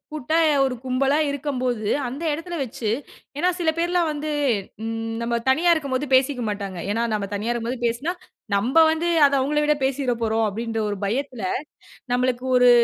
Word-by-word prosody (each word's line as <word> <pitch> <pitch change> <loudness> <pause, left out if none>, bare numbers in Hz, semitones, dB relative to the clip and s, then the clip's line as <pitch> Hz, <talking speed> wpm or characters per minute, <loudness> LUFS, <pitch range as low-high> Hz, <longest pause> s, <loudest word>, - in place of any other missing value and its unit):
கூட்டா 310 +2 0 0.3
ஒரு 265 -2 0
கும்பலா 265 +2 +1
இருக்கம்போது, 255 -6 -2 0.2
அந்த 270 +7 -6
எடத்துல 330 +3 -5
வச்சு 235 -3 -3 0.5
ஏன்னா 355 +5 +2
சில 335 -2 +2
பேர்லாம் 345 0 +1
வந்து 300 +1 -4 0.5
ம் 225 0 -3
நம்ம 235 0 0
தனியா 335 +6 +4
இருக்கும்போது 280 -3 -1
பேசிக்க 260 0 +3
மாட்டாங்க. 200 -3 -4
ஏன்னா 230 +3 0
நம்ம 210 -2 -1
தனியா 210 +4 -1
இருக்கும்போது 240 +1 -3
பேசுனா 255 +9 -2 0.4
நம்ம 255 +11 +4
வந்து 320 +2 -1 0.2
அதை 280 0 +3
அவங்கள 295 +3 +1
விடப் 300 -1 +1
பேசிறப்போறோம் 235 -5 0
அப்படின்னு 225 +2 -3
ஒரு 205 - -3
பயத்துல, 245 +1 -2 0.7
நம்பளுக்கு 250 0 0
ஒரு 250 0 +6
255 Hz, 155 wpm, -23 LUFS, 230-295 Hz, 0.7 s, ஒரு